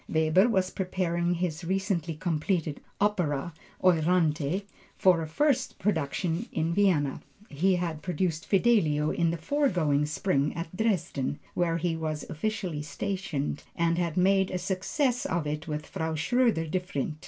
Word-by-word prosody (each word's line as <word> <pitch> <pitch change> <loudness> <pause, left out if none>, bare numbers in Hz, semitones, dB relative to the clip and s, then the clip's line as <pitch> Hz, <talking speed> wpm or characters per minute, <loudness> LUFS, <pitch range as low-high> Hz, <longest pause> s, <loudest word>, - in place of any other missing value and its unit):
Weber 160 +7 +4
was 190 -4 +1
preparing 175 -2 -1
his 170 -1 -2
recently 180 -3 -1
completed 160 -1 -1 0.2
opera 170 -7 0 0.3
Euryanthe, 165 -1 +2 0.3
for 180 -3 +4
a 160 - -3
first 265 - +1
production 170 - -1
in 165 +1 0
Vienna. 170 -9 +2 0.3
He 180 +6 +2
had 170 -3 -2
produced 175 -1 -2
Fidelio 180 -9 +3
in 170 -1 +1
the 170 - -1
foregoing 160 - +1
spring 150 -2 +1
season - - -5
at 165 +1 -5
Dresden, 180 - 0 0.2
where 170 -2 +1
he 170 0 -1
was 155 -2 -3
officially 180 -3 -2
stationed, 160 -4 -3
and 170 0 +1
had 170 -2 -1
made 190 +1 +4
a 185 - -2
success 240 - 0
of 170 -3 -1
it 150 +2 -3
with 150 -1 -3
Frau 160 0 -3
Schroeder 230 0 +2
Devrient. 160 -3 -2
170 Hz, 140 wpm, -28 LUFS, 155-190 Hz, 0.3 s, Weber